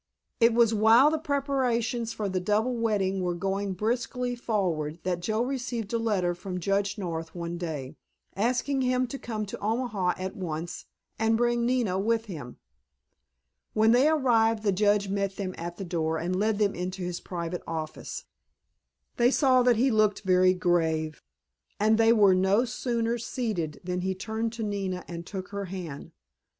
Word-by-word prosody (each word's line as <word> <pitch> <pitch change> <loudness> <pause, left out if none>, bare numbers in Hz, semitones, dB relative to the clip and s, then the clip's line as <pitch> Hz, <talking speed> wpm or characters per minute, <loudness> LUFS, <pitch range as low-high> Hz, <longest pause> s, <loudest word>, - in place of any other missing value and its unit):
It 230 -1 +5
was 230 -1 +4
while 225 +7 +6
the 315 - 0
preparations 255 -6 0
for 210 -2 -3
the 185 -1 -1
double 215 +6 +1
wedding 200 -5 0
were 175 -1 -1
going 195 +2 -2
briskly 245 +4 -1
forward 175 -10 -1
that 180 -1 -1
Joe 215 +6 0
received 245 -4 -3
a 230 - +1
letter 200 -6 +1
from 180 +1 -5
Judge 200 +2 0
North 165 -4 -5
one 170 0 -4
day, 150 -4 -5 0.4
asking 250 +6 0
him 255 0 +2
to 265 +3 -6
come 215 -2 -4
to 200 - -7
Omaha 215 -4 0
at 185 0 -5
once, 170 -2 -5 0.3
and 225 0 +3
bring 240 0 +1
Nina 235 -7 +1
with 225 +2 +1
him. 150 - -8 1.2
When 220 +1 +5
they 255 +5 +5
arrived 225 -7 +3
the 205 - +3
Judge 205 +1 +2
met 195 0 -1
them 185 -2 -4
at 170 +1 -6
the 195 - -5
door 160 -2 -1
and 175 +3 -2
led 210 +2 +1
them 205 -2 +2
into 180 +1 -4
his 175 0 -3
private 170 -1 -4
office. 160 -1 -5 0.9
They 240 0 +5
saw 260 -2 +4
that 245 -1 +4
he 255 +4 +3
looked 215 -2 +2
very 185 -1 +4
grave, 160 -3 0 0.6
and 215 +2 +3
they 225 0 +6
were 205 -4 +6
no 190 +6 +3
sooner 235 -1 -1
seated 215 - -3
than 180 0 -2
he 190 +1 -1
turned 220 +4 -3
to 230 -1 -4
Nina 195 -3 -3
and 170 0 -7
took 190 -2 -6
her 200 0 -4
hand. 170 -5 -7
205 Hz, 170 wpm, -27 LUFS, 180-230 Hz, 1.2 s, while